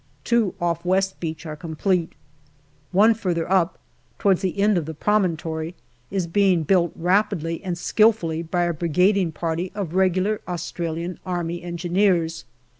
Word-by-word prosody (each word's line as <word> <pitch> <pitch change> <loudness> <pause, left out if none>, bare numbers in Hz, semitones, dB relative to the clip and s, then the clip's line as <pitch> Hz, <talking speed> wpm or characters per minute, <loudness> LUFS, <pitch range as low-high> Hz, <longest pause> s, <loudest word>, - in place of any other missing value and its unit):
Two 235 -5 +1
off 170 -1 -1
West 190 +1 +1
Beach 160 0 -5
are 155 -1 -5
complete. 165 +3 -1 0.8
One 210 +5 +5
further 180 -7 -2
up, 185 -2 +2 0.4
towards 195 -3 +2
the 190 0 -2
end 205 +1 +4
of 155 - -6
the 160 - -4
AUGUST 155 - -22
213 210 0 +3 0.3
promontory, 160 +2 -5 0.3
is 190 -3 -1
being 180 -1 +2
built 175 0 +2
rapidly 180 -2 0
and 180 -3 -3
skilfully 180 -5 +2
by 170 +1 -1
a 175 0 0
bridg 175 +5 +2
ing 185 -4 +1
party 165 +3 -3
of 190 -6 -4
regular 190 +3 +1
Australian 170 0 -4
Army 175 -2 -3
Engineers. 175 - 0
175 Hz, 155 wpm, -23 LUFS, 165-195 Hz, 0.8 s, One